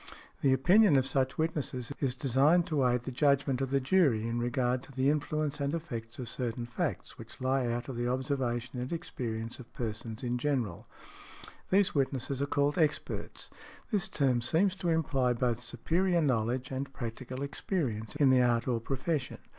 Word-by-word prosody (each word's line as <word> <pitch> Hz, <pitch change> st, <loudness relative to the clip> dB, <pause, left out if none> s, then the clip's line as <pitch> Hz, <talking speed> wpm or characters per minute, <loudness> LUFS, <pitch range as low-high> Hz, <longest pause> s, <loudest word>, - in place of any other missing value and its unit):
The 135 Hz, -, +4 dB
opinion 180 Hz, +7 st, +5 dB
of 130 Hz, -, +2 dB
such 135 Hz, -1 st, 0 dB
witnesses 145 Hz, -6 st, -2 dB
is 130 Hz, -3 st, 0 dB
designed 140 Hz, +7 st, +3 dB
to 145 Hz, -7 st, +1 dB
aid 125 Hz, 0 st, +1 dB
the 130 Hz, -, -6 dB
judgment 140 Hz, -1 st, +2 dB
of 135 Hz, -, -1 dB
the 140 Hz, +1 st, +2 dB
jury 135 Hz, -7 st, +3 dB
in 115 Hz, +1 st, -1 dB
regard 125 Hz, +1 st, 0 dB
to 135 Hz, -, -14 dB
the 135 Hz, +1 st, +2 dB
influence 150 Hz, 0 st, -1 dB
and 140 Hz, +2 st, 0 dB
effects 120 Hz, -8 st, -6 dB
of 125 Hz, -, -5 dB
certain 120 Hz, 0 st, -3 dB
facts 120 Hz, -2 st, -4 dB
which -, -, -10 dB
lie 130 Hz, -1 st, +1 dB
out 120 Hz, +1 st, -2 dB
of 135 Hz, -, -5 dB
the 120 Hz, 0 st, -1 dB
observation 125 Hz, -1 st, -2 dB
and 125 Hz, -, -5 dB
experience 115 Hz, -8 st, -4 dB
of 125 Hz, -1 st, -12 dB
persons 115 Hz, +1 st, -4 dB
in 125 Hz, 0 st, -1 dB
general. 125 Hz, -10 st, -1 dB, 0.8 s
These 195 Hz, 0 st, +3 dB
witnesses 135 Hz, -1 st, -1 dB
are 140 Hz, -, 0 dB
called 145 Hz, +3 st, +1 dB
"experts." 150 Hz, -2 st, -2 dB, 0.4 s
This 205 Hz, -5 st, +1 dB
term 130 Hz, -4 st, +1 dB
seems 175 Hz, +10 st, +2 dB
to 175 Hz, -2 st, -1 dB
imply 135 Hz, -6 st, +2 dB
both 120 Hz, -1 st, 0 dB
superior 170 Hz, +9 st, +1 dB
knowledge 125 Hz, -1 st, 0 dB
and 135 Hz, +1 st, -3 dB
practical 130 Hz, +2 st, -5 dB
experience 140 Hz, -, -3 dB
in 140 Hz, -3 st, +4 dB
the 130 Hz, -1 st, +5 dB
art 120 Hz, -1 st, +2 dB
or 120 Hz, -2 st, +1 dB
profession. 135 Hz, +2 st, -2 dB
130 Hz, 175 wpm, -31 LUFS, 120-145 Hz, 0.8 s, opinion